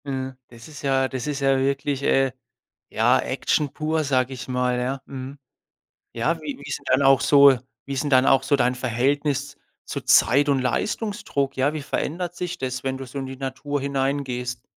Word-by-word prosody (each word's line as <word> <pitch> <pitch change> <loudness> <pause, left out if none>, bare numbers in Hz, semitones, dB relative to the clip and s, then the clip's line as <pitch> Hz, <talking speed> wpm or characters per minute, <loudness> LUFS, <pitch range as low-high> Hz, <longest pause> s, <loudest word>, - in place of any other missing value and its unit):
Ja, 130 -1 -4
das 115 -1 -14
ist 150 -2 -11
ja 135 -1 +2
das 130 +1 -5
ist 145 -1 -3
ja 135 -1 +3
wirklich, 140 +1 -1
äh, 135 -1 +2 0.6
ja, - - +3
Action 145 -3 -1
pur, 155 +1 -1
sage 130 -2 +1
ich 125 - -8
mal, 125 -1 0
ja, 130 +2 -2
mhm. 135 +1 -8 0.7
Ja, 155 +8 -1
wie 150 -2 -5
wie 140 - -11
ist 140 - -3
'n - - -21
dann 135 - +3
auch 135 -2 +5
so 140 -3 +6 0.3
wie 140 - -5
ist 135 +2 -1
'n 145 - -2
dann 130 -1 +5
auch 135 -1 +5
so 140 +2 +2
dein 125 -2 +2
Verhältnis 140 +3 -1 0.3
zu - - -5
Zeit 135 - +4
und 140 -1 +3
Leistungsdruck? 145 - -2
Ja, 135 +3 +1
wie 155 -2 -5
verändert 175 +5 -3
sich 180 -1 -4
das, 125 -1 -4
wenn 130 0 -2
du 135 - -7
so 130 +2 -6
in 135 - -5
die 135 0 -8
Natur 135 +2 -3
hinein 140 +1 -1
gehst? 125 -2 -5
135 Hz, 205 wpm, -23 LUFS, 130-145 Hz, 0.7 s, so